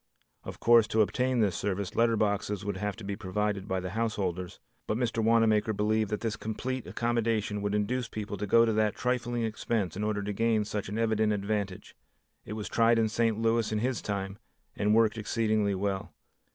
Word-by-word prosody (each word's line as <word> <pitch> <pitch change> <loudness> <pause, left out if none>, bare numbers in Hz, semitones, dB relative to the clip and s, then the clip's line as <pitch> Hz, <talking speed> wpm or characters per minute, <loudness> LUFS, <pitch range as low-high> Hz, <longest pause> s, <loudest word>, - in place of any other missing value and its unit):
Of - - -8
course 115 -2 +6
to 110 0 +3
obtain 125 +3 0
this 100 -5 +2
service, 100 -1 -2
letter 115 -1 +3
boxes 105 -1 -1
would 100 - -2
have 105 -2 -2
to 110 - -11
be 100 0 -3
provided 105 0 -2
by 95 -1 -1
the 90 -1 -5
householders, 95 -5 -2 0.3
but 110 - 0
Mr. 115 -2 0
Wanamaker 110 -1 +3
believed 105 +1 +1
that 105 - -2
this 115 -2 -1
complete 125 +3 -4
accommodation 115 -3 -1
would 105 0 -1
induce 120 +4 -1
people 105 -3 -5
to 105 +2 -3
go 115 +3 +6
to 110 - +1
that 105 -1 +1
trifling 120 -1 -1
expense 110 -4 -2
in 105 - -3
order 105 -1 -1
to 105 +1 -3
gain 110 0 +1
such 105 -2 -4
an 105 - -4
evident 110 -1 +2
advantage. 100 -2 -3 0.5
It 105 - -6
was 105 -1 -5
tried 115 0 +3
in 110 -1 +2
St. 115 0 +1
Louis 115 -1 +1
in 110 - 0
his 125 +3 -1
time, 100 0 -4 0.4
and 105 +1 +2
worked 115 -1 +3
exceedingly 110 -2 +1
well. 95 0 -2
110 Hz, 195 wpm, -29 LUFS, 100-115 Hz, 0.5 s, course